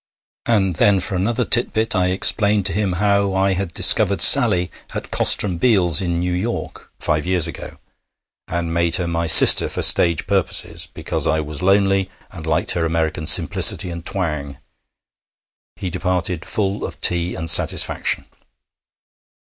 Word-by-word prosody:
And 95 -7 -1
then 100 -2 +1
for 95 - -4
another 115 +6 -2
tit 120 - +1
bit 110 0 -2
I 90 -2 0
explained 100 +2 +2
to 95 - -1
him 100 -1 -3
how 100 +1 -1
I 95 0 0
had 95 -1 -5
discovered 100 +3 +3
Sally 100 -10 +5 0.2
at - - -8
Koster - - 0
and 90 -4 -5
Bial's, 95 -8 +1
in 85 -2 -4
New 90 +1 -4
York, 100 +7 -7
five 75 +2 -3
years 90 -3 +1
ago, 85 - -9 0.7
and 85 -1 -5
made 85 -1 0
her 90 -2 -3
my 85 0 -4
sister 80 - +7
for - - -4
stage 85 -3 +2
purposes 95 -2 -2
because - - -5
I 80 - -1
was 75 -1 -7
lonely, 95 0 0 0.2
and 80 -4 -11
liked 80 +2 0
her 85 - -3
American 80 -1 -4
simplicity 90 - +4
and 85 -1 -9
twang. 75 -7 -6 1.2
He 90 - -7
departed 90 -2 -4
full 100 -1 -4
of - - -8
tea 85 0 0
and 80 - -7
satisfaction. 80 - +1
90 Hz, 155 wpm, -17 LUFS, 85-100 Hz, 1.2 s, sister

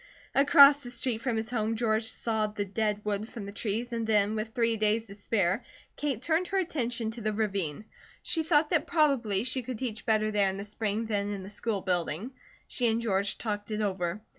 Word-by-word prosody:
Across 280 +1 +7
the 245 - -7
street 240 -1 -2
from 235 -2 -1
his 220 +1 -3
home 225 -2 0
George 220 -1 +1
sawed 220 -1 -1
the 205 - -1
dead 210 +1 -1
wood 210 +1 -2
from 220 -4 -7
the 200 - -6
trees 225 +4 -3
and 230 -1 -2
then, 210 -1 +3
with 215 0 -2
three 230 0 +1
days 215 +1 +1
to 200 - -10
spare, 200 0 0 0.3
Kate 270 -5 -2
turned 335 +4 +1
her 390 - -1
attention 245 -10 -1
to 230 +1 -9
the 215 0 0
ravine. 200 -5 -2 0.4
She 325 - 0
thought 310 -1 +2
that 330 - +2
probably 255 - +2
she 255 +1 -1
could 250 0 -5
teach 220 -4 -4
better 215 -1 +2
there 205 -2 +3
in 190 - -4
the 200 - -5
spring 210 +1 -2
than 205 -2 -1
in 200 -2 -4
the 195 - -9
school 210 -1 -1
building. 180 - -2 0.4
She 245 - 0
and 225 0 +2
George 200 -3 0
talked 205 -2 -4
it 215 0 -2
over. 185 0 -2
220 Hz, 215 wpm, -29 LUFS, 205-240 Hz, 0.4 s, Across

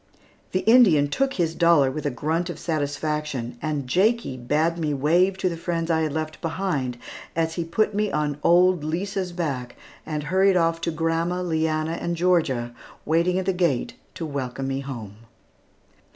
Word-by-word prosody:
The 185 - 0
Indian 205 - +5
took 270 - 0
his 165 -3 0
dollar 165 -6 +4
with 150 +1 -3
a - - +2
grunt 160 +7 -2
of 170 - -5
satisfaction, 150 -6 -3
and 150 -3 -2
Jakie 205 - +1
bade 150 +7 0
me 150 -3 0
wave 175 +7 +2
to 190 - 0
the 170 - -1
friends 165 0 -2
I 160 -1 +2
had 155 -2 0
left 155 +1 -4
behind, 160 -8 -2 0.4
as 165 0 0
he 170 - -2
put 205 +6 0
me 210 0 0
on 150 -1 -1
old 180 -1 +4
Lisa's 185 +3 -2
back 140 -8 -3 0.3
and 150 -1 -4
hurried 190 +4 +3
off 165 -1 +1
to 170 - -1
grandma, 165 +3 -1
Leanna, 160 -1 -1
and 170 0 -1
Georgia, 155 -9 +1 0.3
waiting 170 +3 +2
at 190 - -1
the 190 - +1
gate 170 -8 0 0.2
to 165 - -4
welcome 135 -2 -4
me 135 0 -2
home. 115 -7 -7
165 Hz, 170 wpm, -24 LUFS, 145-175 Hz, 0.4 s, Indian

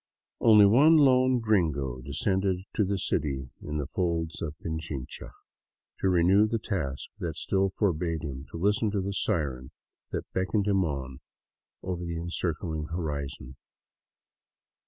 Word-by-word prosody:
Only 105 -3 +7
one 145 +11 +6
lone 130 -3 +5
gringo 75 - 0
descended 95 +7 0
to 105 - +2
the 100 0 0
city 70 -7 -2
in 75 0 -4
the 75 - -2
folds 85 0 -2
of 75 -2 -4
Pichinoha, 80 -5 -6 0.7
to 95 - +2
renew 95 +4 +4
the 115 - 0
task 75 -11 -3
that 80 -3 -3
still 95 +3 +1
forbade 85 -5 -1
him 70 -1 -6
to - - -7
listen 105 +5 +2
to 100 -1 -1
the 100 +1 -3
siren 65 -9 -1 0.4
that - - -3
beckoned 95 +2 0
him 100 -2 +2
on 65 -5 -4 0.6
over 90 -1 -3
the 85 -1 -4
encircling 85 -1 -3
horizon. 70 -5 -5
85 Hz, 135 wpm, -28 LUFS, 75-100 Hz, 0.7 s, Only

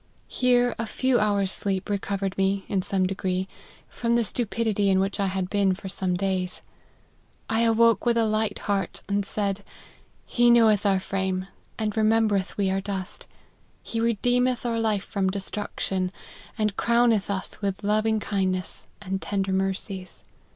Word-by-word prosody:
Here 245 -1 +2
a 230 - -2
few 255 +2 +1
hours 200 -2 +1
sleep 190 -1 -2
recovered 195 -1 -2
me, 195 0 0
in 195 - 0
some 185 0 0
degree, 185 0 -1 0.4
from 235 0 -1
the 235 - +3
stupidity 220 -2 0
in 190 -1 +4
which 195 +2 -1
I 200 - +2
had 190 -1 -2
been 195 -1 +2
for 195 0 -8
some 185 -1 -1
days. 185 -1 -2 0.8
I 225 - 0
awoke 230 -2 +4
with 235 -1 +2
a 230 - +3
light 215 0 0
heart, 195 -3 -1
and 200 0 0
said, 200 0 -2 0.3
' - - -27 0.3
He 240 0 +3
knoweth 220 -3 +5
our 195 -1 +3
frame, 190 -1 -2 0.3
and 215 -2 -2
remembereth 215 -3 +2
we 195 -2 +1
are 195 0 0
dust. 195 -2 -5 0.6
He 230 - -4
re 230 -1 +1
deemeth 250 0 +2
our 230 -1 0
life 215 -3 0
from 195 -3 0
destruction, 190 -1 -2 0.5
and 215 -2 0
crowneth 235 -4 +3
us 195 +1 -4
with 200 0 -2
loving 215 +1 +2
kindness 190 -3 -2 0.2
and 190 0 -3
tender 195 -1 -1
mercies. 190 0 -3
200 Hz, 160 wpm, -25 LUFS, 190-225 Hz, 0.8 s, knoweth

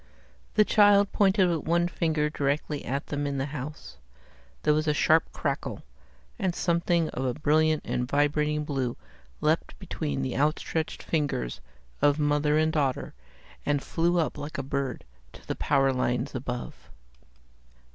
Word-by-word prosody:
The 215 - +5
child 205 -1 +5
pointed 195 -2 +4
with 165 -3 -1
one 170 +1 +3
finger 160 -3 0
directly 145 0 -1
at 140 +4 -3
them 145 0 -2
in 140 -1 -2
the 135 - -1
house. 145 - -7 0.7
There 150 - +4
was 155 +1 0
a 150 - +2
sharp 160 +2 +3
crackle, - - -3 0.6
and 185 -4 0
something 170 -1 +1
of 130 - -4
a 125 -2 -1
brilliant 155 +1 +2
and 125 0 -1
vibrating 150 +1 +1
blue 135 -5 -2 0.4
leaped - - 0
between 70 -2 -3
the 65 - -2
out 150 +3 +2
stretched 160 -1 -3
fingers 145 - -2 0.4
of 145 0 +4
mother 150 0 +2
and 155 0 +2
daughter, 140 -4 -1 0.5
and 145 -1 0
flew 175 +1 +1
up 165 -3 0
like 145 +2 -6
a 140 - -2
bird 135 -1 -3 0.3
to - - -14
the - - -2
power 135 -2 +2
lines 125 +1 -1
above. 125 -2 -6
150 Hz, 155 wpm, -27 LUFS, 140-160 Hz, 0.7 s, The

